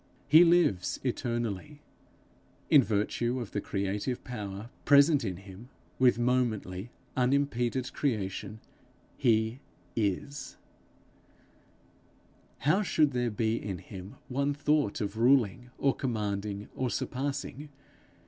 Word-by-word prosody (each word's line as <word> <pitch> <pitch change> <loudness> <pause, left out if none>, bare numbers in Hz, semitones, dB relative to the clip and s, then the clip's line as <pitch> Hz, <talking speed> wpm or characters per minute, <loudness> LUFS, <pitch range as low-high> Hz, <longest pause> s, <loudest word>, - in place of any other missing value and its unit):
He 160 +4 +8
lives 170 - +3
eternally; 120 +1 -3 0.9
in 145 - +9
virtue 120 +3 0
of 115 -5 -6
the 105 - -2
creative 100 +6 -2
power 105 -2 -6
present 145 0 +6
in 95 -5 -3
him 100 +5 -12 0.3
with 125 -2 +5
momently, 120 -5 0 0.3
unimpeded 130 -1 +1
creation, 105 -4 -2 0.6
he 110 -1 +2 0.4
is. 130 +6 -2 2.0
How 170 +8 +3
should 155 -7 +2
there 125 -1 0
be 110 +1 0
in 95 -3 -3
him 95 +2 -10
one 140 +2 0
thought 145 -5 +1
of 100 +1 -3
ruling 125 -1 +3
or 140 -1 +2
commanding 105 -4 -3
or 130 -1 -1
surpassing! 140 +3 -3
120 Hz, 105 wpm, -30 LUFS, 105-140 Hz, 2.0 s, in